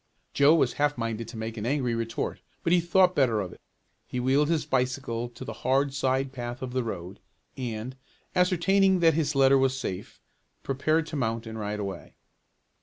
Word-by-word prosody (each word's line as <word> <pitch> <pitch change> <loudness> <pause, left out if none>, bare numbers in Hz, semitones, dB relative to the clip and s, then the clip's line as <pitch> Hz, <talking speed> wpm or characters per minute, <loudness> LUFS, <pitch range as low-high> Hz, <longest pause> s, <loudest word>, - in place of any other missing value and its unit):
Joe 145 +3 +6
was 135 -6 +2
half 145 -1 +2
minded 115 -1 -3
to 115 0 -9
make 110 +1 -5
an 105 - -4
angry 130 -3 0
retort 115 0 -3 0.2
but 170 - +2
he 180 - +6
thought 180 +2 +4
better 125 -7 +3
of 90 -3 -4
it. - - -17 0.5
He 125 - -3
wheeled 135 +4 +2
his 165 -2 +1
bicycle 125 -2 -1
to 120 +2 -10
the - - -5
hard 135 +1 +2
side 135 -1 0
path 120 0 -5
of 125 -1 -5
the 130 -1 0
road, 95 -3 -6 0.4
and, 120 0 -5 0.4
ascertaining 185 +1 +3
that 165 -1 +5
his 150 -1 0
letter 135 0 +5
was 130 0 +1
safe, 95 -8 -5 0.4
prepared 155 +4 +1
to 160 - -7
mount 115 -3 -1
and 110 0 -6
ride 105 0 -3
away. 100 -2 -6
130 Hz, 185 wpm, -27 LUFS, 115-145 Hz, 0.5 s, Joe